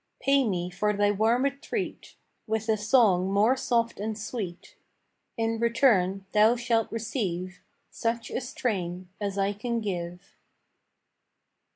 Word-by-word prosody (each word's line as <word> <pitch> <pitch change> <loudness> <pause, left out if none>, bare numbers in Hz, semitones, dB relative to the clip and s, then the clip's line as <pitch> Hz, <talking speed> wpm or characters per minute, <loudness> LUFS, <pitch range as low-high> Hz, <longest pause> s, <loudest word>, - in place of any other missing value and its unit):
Pay 275 -1 +3
me 180 -2 -2
for 210 +3 0
thy 205 0 +2
warm 225 +5 +2
retreat 280 0 -3 0.3
With 220 0 -1
a 220 - +4
song 210 -4 +3
more 210 +6 +4
soft 235 -4 0
and 215 +1 -3
sweet; 205 -5 -6 0.6
In 225 0 0
return 225 -6 +2
thou 215 +2 +5
shalt 235 -2 0
receive 190 -6 -3 0.3
Such 230 0 -2
a - - -2
strain 185 -9 -3
as 200 -1 -2
I 200 +1 +1
can 235 +3 -2
give. 180 -2 -5
215 Hz, 130 wpm, -27 LUFS, 195-235 Hz, 0.6 s, thou